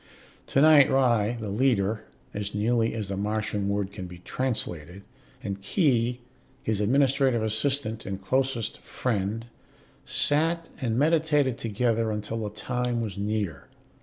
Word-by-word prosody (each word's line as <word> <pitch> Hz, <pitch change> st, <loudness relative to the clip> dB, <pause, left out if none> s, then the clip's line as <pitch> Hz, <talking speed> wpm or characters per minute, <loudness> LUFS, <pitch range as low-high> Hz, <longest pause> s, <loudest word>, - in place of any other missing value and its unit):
Tonight 145 Hz, 0 st, +6 dB
Ry, 120 Hz, -4 st, +2 dB
the 110 Hz, -2 st, -4 dB
leader 110 Hz, -3 st, +1 dB, 0.3 s
(as 105 Hz, 0 st, -4 dB
nearly 115 Hz, +2 st, +1 dB
as 105 Hz, -3 st, -4 dB
the 100 Hz, -, -2 dB
Martian 105 Hz, 0 st, -1 dB
word 100 Hz, -1 st, -1 dB
can 95 Hz, -2 st, -7 dB
be 90 Hz, 0 st, -10 dB
translated), 90 Hz, -, -4 dB, 0.4 s
and 100 Hz, -1 st, -4 dB
Khee, 125 Hz, -, +1 dB, 0.4 s
his 110 Hz, -2 st, 0 dB
administrative 130 Hz, +1 st, +3 dB
assistant 110 Hz, 0 st, -1 dB
and 95 Hz, -1 st, -4 dB
closest 125 Hz, +3 st, -1 dB
friend, 110 Hz, -1 st, -2 dB, 0.6 s
sat 165 Hz, +3 st, +1 dB
and 115 Hz, -3 st, 0 dB
meditated 150 Hz, -3 st, +2 dB
together 115 Hz, 0 st, 0 dB
until 105 Hz, +1 st, -3 dB
the 105 Hz, -2 st, -3 dB
time 125 Hz, +3 st, -2 dB
was 110 Hz, -4 st, -3 dB
near. 100 Hz, -7 st, -3 dB
115 Hz, 130 wpm, -27 LUFS, 105-130 Hz, 0.6 s, Tonight